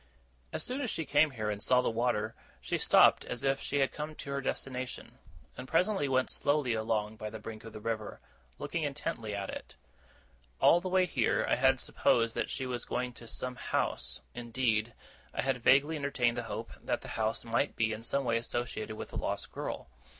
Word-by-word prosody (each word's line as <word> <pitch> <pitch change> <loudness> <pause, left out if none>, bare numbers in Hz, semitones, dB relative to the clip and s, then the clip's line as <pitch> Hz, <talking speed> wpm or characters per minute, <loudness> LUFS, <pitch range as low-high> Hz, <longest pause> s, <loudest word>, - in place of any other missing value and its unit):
As - - -2
soon 255 +3 -2
as 250 - -1
she 160 - -2
came 150 +2 +4
here, 110 -5 -2
and 105 -1 -4
saw 125 +2 +4
the - - +1
water, 110 -2 0 0.3
she - - -2
stopped - - +6
as 125 - -4
if 135 0 +2
she 145 0 0
had 135 - +2
come 155 +1 -5
to 140 - -6
her 140 0 -1
destination; 130 -1 -4 0.4
and 130 - -7
presently 180 0 +2
went 130 -1 +2
slowly 145 -4 +2
along 110 -1 -1
by 110 0 -4
the 110 - -7
brink 110 0 -8
of 115 - -8
the 110 - -8
river, 110 -1 -3 0.4
looking 165 - -3
intently 135 -7 -3
at 100 -1 -3
it. - - -8 0.8
All 175 - +6
the 185 - -3
way 185 0 +4
here, 135 -9 +1
I - - +3
had 130 0 +4
supposed 115 -1 +2
that - - -1
she 130 - -2
was 125 -1 -2
going 125 0 -2
to 120 -1 -11
some 125 +2 -4
house; - - -1
indeed, 120 -2 0 0.4
I - - 0
had 135 -2 0
vaguely 145 +6 +5
entertained 130 -4 +1
the 120 - -1
hope 110 +3 -4
that - - -1
the - - -9
house 110 +1 -1
might 115 +5 +1
be 110 -1 +1
in 110 - -6
some 140 +4 0
way 115 -2 +2
associated 115 -2 -3
with - - -6
the - - -6
lost - - -2
girl. - - -4
125 Hz, 205 wpm, -32 LUFS, 110-140 Hz, 0.8 s, stopped